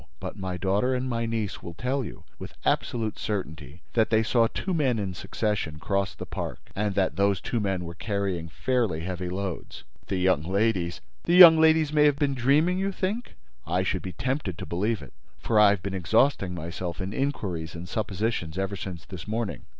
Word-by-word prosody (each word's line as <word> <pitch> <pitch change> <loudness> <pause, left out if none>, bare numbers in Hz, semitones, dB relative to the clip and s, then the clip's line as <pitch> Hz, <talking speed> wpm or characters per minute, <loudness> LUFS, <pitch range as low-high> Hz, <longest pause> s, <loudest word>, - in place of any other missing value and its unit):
But - - -6
my 95 -2 -4
daughter 100 +8 +1
and 125 +1 -2
my 115 -2 -1
niece 110 -3 -2
will 85 - -8
tell 130 +6 -1
you, - - -9 0.2
with - - -9
absolute 110 -3 0
certainty, 80 - -5
that 110 -2 +3
they 110 -1 +3
saw 115 +1 +3
two 190 +10 -3
men 135 -8 +2
in 100 -3 -2
succession 100 -5 -2
cross 100 +4 -1
the - - -7
park - - -6
and 100 -1 -1
that 95 -2 +1
those 100 -1 +3
two 120 - -2
men 95 -4 -1
were 85 - -6
carrying 95 -3 -2
fairly 115 -3 0
heavy 90 +1 -4
loads." 95 -8 -5 0.2
"The 95 - -1
young 90 -4 +3
ladies—" 95 0 0 0.2
"The 175 - +3
young 170 -3 +11
ladies 160 -1 +4
may 150 -1 +5
have 145 -2 +4
been 145 -2 +1
dreaming, 145 +8 +3
you 195 +1 0
think? 200 +6 -3 0.3
I 90 +3 +1
should 95 - -1
be 90 - -6
tempted 130 - -2
to - - -6
believe 105 +5 -1
it, - - -13 0.2
for 110 -2 +1
I 105 -1 +8
have 100 -3 0
been 100 - -3
exhausting 95 +1 +2
myself 85 +2 -5
in 95 +1 -4
inquiries 95 - -2
and 85 +1 -7
suppositions 100 -4 -2
ever 95 +1 -1
since 90 -3 -7
this 95 -1 -8
morning. 105 - -3
100 Hz, 195 wpm, -27 LUFS, 90-120 Hz, 0.3 s, young